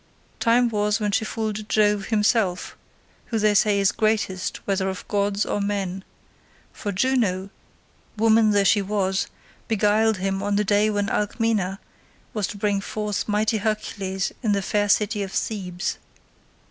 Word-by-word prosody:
"Time 240 +1 +4
was 210 0 0
when 210 -1 0
she 200 - +1
fooled 215 -1 -4
Jove 210 -2 +2
himself, 210 -4 +1 0.5
who 230 - -1
they 215 -1 +3
say 205 0 +3
is 195 -1 +3
greatest 210 -4 -1
whether 195 -1 0
of 190 - -7
gods 200 0 0
or 205 - -1
men; 195 -2 -2 0.7
for 205 - -4
Juno, 200 -4 0 0.7
woman 220 0 +4
though 205 -1 +3
she 205 +1 +4
was, 195 -1 -1 0.4
beguiled 220 0 +2
him 195 +1 -2
on 205 0 0
the 210 - +2
day 210 +1 +3
when 205 -1 0
Alcmena 210 -3 0 0.6
was 210 -3 -1
to 205 - -7
bring 200 -1 0
forth 210 0 -3
mighty 215 +1 +1
Hercules 200 -2 -2
in 215 -4 +1
the 200 -1 0
fair 205 +1 0
city 210 +1 +2
of 195 -1 -4
Thebes. 185 -5 -3
205 Hz, 150 wpm, -24 LUFS, 195-215 Hz, 0.7 s, Time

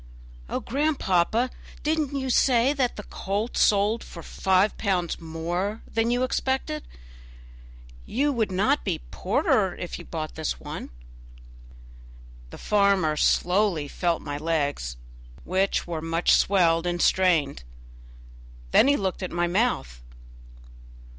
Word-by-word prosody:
"Oh, - - -2
grandpapa, 245 - +1 0.3
did 315 +1 +1
you 275 -2 -3
not 260 - -1
say 250 +1 +4
the 260 -4 +1 0.2
colt 205 +4 -3
sold 210 +2 +3
for 170 - -10
five 190 +5 +1
pounds 180 -4 -1
more 175 +6 -3
than 225 +1 0
you 245 +1 +1
expected? 265 +4 -2 1.2
You 285 +4 +1
would 220 -5 0
not 185 - +1
be - - -2
poorer - - +1
if - - -6
you - - -8
did - - -19
buy - - -3
this - - -3
one." - - -7 1.6
The - - -10
farmer 200 -6 +2
slowly 180 -1 +2
felt 170 +3 -1
my 145 -1 -4
legs, 145 - -1 0.5
which 190 +2 0
were 165 -2 -4
much 165 +1 +1
swelled 175 -3 +3
and 175 0 -1
strained; 165 - +2 1.1
then - - +6
he 285 0 +4
looked 190 -2 -2
at 185 - -3
my 175 0 0
mouth. 170 - -1
190 Hz, 125 wpm, -25 LUFS, 165-230 Hz, 1.6 s, then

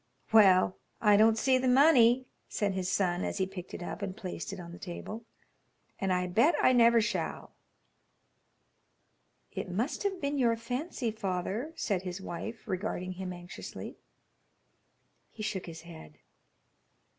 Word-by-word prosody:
"Well, 190 -4 +6 0.2
I 210 -2 +5
don't 220 +2 +5
see 260 +2 +3
the 255 - 0
money," 255 -2 +5 0.2
said 205 -2 -1
his 185 0 -2
son 180 -2 +1
as - - -3
he 190 - +1
picked 185 -2 -8
it - - -6
up 175 - -6
and 195 -1 -4
placed 185 -4 -5
it 195 - -7
on 170 -1 -9
the 175 - -10
table, 210 +5 -7 0.7
"and 195 -1 0
I 180 0 +1
bet 230 - +3
I 255 - +5
never 235 -1 +6
shall." 210 -6 -3 2.0
"It - - -5
must 220 +10 -2
have 395 -2 -1
been 285 -1 -1
your 235 -3 +3
fancy, 245 +2 -3
father," 205 - -3
said 195 - -1
his 180 0 -5
wife, 205 +6 -7
regarding 185 -2 -3
him 185 0 -5
anxiously. 175 0 -8 1.3
He 215 - -8
shook 195 -3 -3
his 165 -1 -8
head. 160 - -12
200 Hz, 150 wpm, -30 LUFS, 180-235 Hz, 2.0 s, Well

